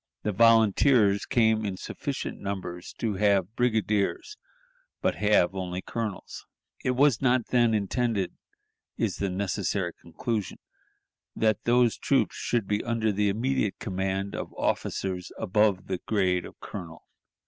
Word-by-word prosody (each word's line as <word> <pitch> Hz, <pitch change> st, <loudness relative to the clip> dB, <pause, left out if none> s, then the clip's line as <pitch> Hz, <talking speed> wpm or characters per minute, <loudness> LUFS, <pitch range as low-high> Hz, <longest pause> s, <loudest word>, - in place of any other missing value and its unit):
The 105 Hz, -, 0 dB
volunteers 110 Hz, 0 st, +4 dB
come 110 Hz, -2 st, +3 dB
in 100 Hz, -3 st, -3 dB
sufficient -, -, -5 dB
numbers 95 Hz, -3 st, -5 dB
to 110 Hz, -4 st, -2 dB
have 100 Hz, 0 st, +2 dB
brigadiers, 110 Hz, -, 0 dB, 0.6 s
but -, -, +1 dB
have 105 Hz, -3 st, +3 dB
only 90 Hz, -1 st, -4 dB
colonels. 110 Hz, -4 st, -5 dB, 0.4 s
It 125 Hz, -, +1 dB
was 140 Hz, -2 st, +4 dB
not 125 Hz, -3 st, +2 dB
then 120 Hz, -3 st, +3 dB
intended 105 Hz, -1 st, -1 dB, 0.6 s
(is -, -, -1 dB
the 100 Hz, -, -1 dB
necessary 95 Hz, -1 st, -1 dB
conclusion) 105 Hz, +5 st, -4 dB, 0.8 s
that 110 Hz, -2 st, +1 dB
those 120 Hz, -2 st, +3 dB
troops -, -, +1 dB
should 115 Hz, -5 st, -1 dB
be 105 Hz, 0 st, 0 dB
under 115 Hz, -2 st, 0 dB
the 105 Hz, 0 st, +1 dB
immediate 115 Hz, 0 st, 0 dB
command 95 Hz, -1 st, -2 dB
of -, -, -5 dB
officers 90 Hz, -2 st, -2 dB
above 105 Hz, -1 st, +2 dB
the 95 Hz, -2 st, -3 dB
grade 95 Hz, -4 st, 0 dB
of -, -, -16 dB
colonel. 85 Hz, -5 st, -8 dB
105 Hz, 130 wpm, -27 LUFS, 95-115 Hz, 0.8 s, volunteers